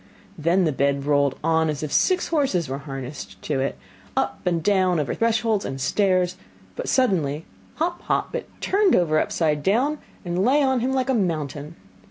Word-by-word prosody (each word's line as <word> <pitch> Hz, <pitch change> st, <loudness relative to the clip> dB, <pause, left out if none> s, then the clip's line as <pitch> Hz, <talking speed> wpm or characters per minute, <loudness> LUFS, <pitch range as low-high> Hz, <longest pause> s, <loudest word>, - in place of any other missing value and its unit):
Then 170 Hz, +3 st, +2 dB
the 155 Hz, -, +2 dB
bed 140 Hz, 0 st, 0 dB
rolled 145 Hz, -2 st, +2 dB
on 160 Hz, 0 st, +2 dB
as 150 Hz, 0 st, -3 dB
if 150 Hz, -, -4 dB
six 370 Hz, -1 st, +2 dB
horses 270 Hz, -, +1 dB
were 135 Hz, +1 st, -4 dB
harnessed 135 Hz, -1 st, -7 dB
to 145 Hz, -3 st, -1 dB
it, 135 Hz, -, -2 dB, 0.4 s
up -, -, 0 dB
and 170 Hz, -2 st, +1 dB
down, 185 Hz, -4 st, +2 dB
over 145 Hz, -4 st, -1 dB
thresholds 225 Hz, -2 st, +1 dB
and 135 Hz, -, -5 dB
stairs, 185 Hz, +3 st, +1 dB, 0.4 s
but -, -, -4 dB
suddenly 165 Hz, -, +1 dB, 0.3 s
hop, 345 Hz, +2 st, -2 dB
hop, -, -, -1 dB
it -, -, -4 dB
turned 395 Hz, -1 st, +3 dB
over 155 Hz, -3 st, +3 dB
upside 150 Hz, -3 st, 0 dB
down, 255 Hz, -, +1 dB, 0.3 s
and 175 Hz, +2 st, 0 dB
lay 280 Hz, +6 st, +4 dB
on 265 Hz, -2 st, +2 dB
him 250 Hz, +3 st, 0 dB
like 265 Hz, 0 st, +1 dB
a -, -, +2 dB
mountain. 155 Hz, -, -2 dB
175 Hz, 180 wpm, -23 LUFS, 150-230 Hz, 0.4 s, lay